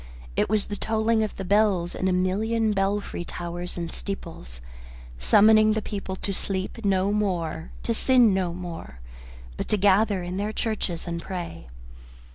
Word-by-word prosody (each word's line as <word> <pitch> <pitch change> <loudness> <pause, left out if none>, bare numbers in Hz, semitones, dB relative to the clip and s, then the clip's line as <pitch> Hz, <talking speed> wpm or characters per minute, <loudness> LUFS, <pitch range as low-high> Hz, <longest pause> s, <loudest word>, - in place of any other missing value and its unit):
It - - +1
was 215 -1 +2
the 205 - -5
tolling 220 +1 +1
of 215 - -2
the 195 - -5
bells 200 -3 +2
in 185 - -1
a - - +2
million 215 +5 +1
belfry 195 -2 -1
towers 175 +1 -5
and 170 -2 -4
steeples, 165 - -6 0.6
summoning 215 - +6
the 220 - 0
people 195 -2 -4
to 195 +1 -3
sleep 195 +4 -2
no 195 0 +2
more, 175 -6 -1
to 230 - 0
sin 245 -2 +5
no 185 -2 0
more, 170 - -7 0.6
but - - -3
to 210 - +1
gather 200 -1 +3
in 180 +1 -4
their 210 +2 -2
churches 210 -8 -2
and 170 0 -3
pray. 170 - -6
195 Hz, 160 wpm, -25 LUFS, 175-215 Hz, 0.6 s, summoning